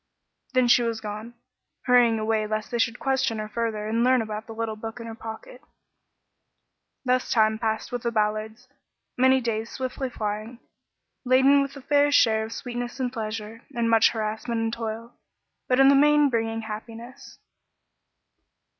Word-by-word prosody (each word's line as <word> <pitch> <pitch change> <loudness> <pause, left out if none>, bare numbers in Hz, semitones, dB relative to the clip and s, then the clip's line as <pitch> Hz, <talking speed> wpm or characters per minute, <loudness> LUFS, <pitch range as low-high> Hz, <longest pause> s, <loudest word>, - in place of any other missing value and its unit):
'" - - -41
Then 255 -1 +4
she 240 - +5
was 230 -1 -2
gone, 215 +2 -7 0.5
hurrying 245 -3 +4
away 215 0 0
lest 215 +2 -3
they 240 - -1
should 230 +1 +1
question 265 -4 0
her 215 0 -4
further 215 -1 -3
and 230 +2 +1
learn 255 -1 +3
about 215 0 -6
the 225 - -8
little 225 -1 -3
book 225 +2 -7
in 230 - -7
her 225 - -6
pocket. 225 +3 -9 1.4
Thus 255 0 +1
time 220 -1 +2
passed 220 -1 -2
with 245 -1 -3
the 235 - -1
Ballards, 215 +2 -2 0.5
many 260 +1 +4
days 230 -2 -3
swiftly 260 0 -4
flying, 215 +1 -4 0.7
laden 265 +2 +5
with 275 0 -4
a 275 - -9
fair 290 +1 +3
share 220 -5 +4
of 220 - -7
sweetness 245 +1 -5
and 250 -1 -2
pleasure, 220 -1 -5
and 230 -1 +1
much 225 -1 +6
of - - -2
harassment 220 +1 -3
and 225 0 -1
toil, 230 +1 -5 0.5
but 255 0 +2
in 270 - +7
the - - +6
main 295 +1 +5
bringing 225 -1 -1
happiness. 225 +3 -9
230 Hz, 170 wpm, -25 LUFS, 220-250 Hz, 1.4 s, in